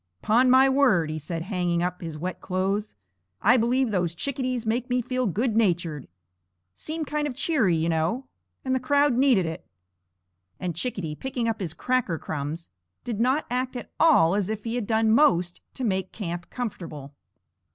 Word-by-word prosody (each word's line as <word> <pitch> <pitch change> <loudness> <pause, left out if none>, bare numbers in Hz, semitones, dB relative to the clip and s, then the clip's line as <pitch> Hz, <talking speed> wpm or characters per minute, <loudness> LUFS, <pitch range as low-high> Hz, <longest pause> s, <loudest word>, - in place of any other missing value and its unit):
"'Pon 245 +4 +4
my 260 +1 +7
word," 255 - +3
he 155 - -4
said, 165 +2 -5
hanging 175 -3 -1
up 180 0 -3
his 165 -3 -6
wet 180 +4 -5
clothes, 195 +3 -2 0.4
"I 240 +5 +5
believe 250 +1 +2
those 175 -4 0
chickadees 255 +2 -2
make 240 +3 -1
me 250 0 +2
feel 255 0 -1
good 220 +4 0
natured. 175 - 0 0.7
Seem 315 - -4
kind 295 0 -1
of 265 - -5
cheery, 265 - +2
you 160 +1 0
know, 170 +11 0 0.4
and 260 - 0
the 260 - +2
crowd 285 +2 +3
needed 245 -7 +3
it." 160 0 -5 1.0
And 175 -3 -3
Chickadee, 180 -5 -3
picking 245 - -3
up 225 -1 -1
his 170 -4 -4
cracker 250 -6 0
crumbs, 155 +2 -5 0.3
did 230 -4 -4
not 260 +6 +2
act 255 +1 -1
at 245 - -7
all 195 - +5
as 200 -1 0
if 215 -1 -4
he 230 - -3
had 240 -4 -2
done 220 -1 +2
most 180 - +3
to 260 - -5
make 190 -4 -1
camp 175 -4 -5
comfortable. 170 - -6
220 Hz, 175 wpm, -25 LUFS, 175-255 Hz, 1.0 s, my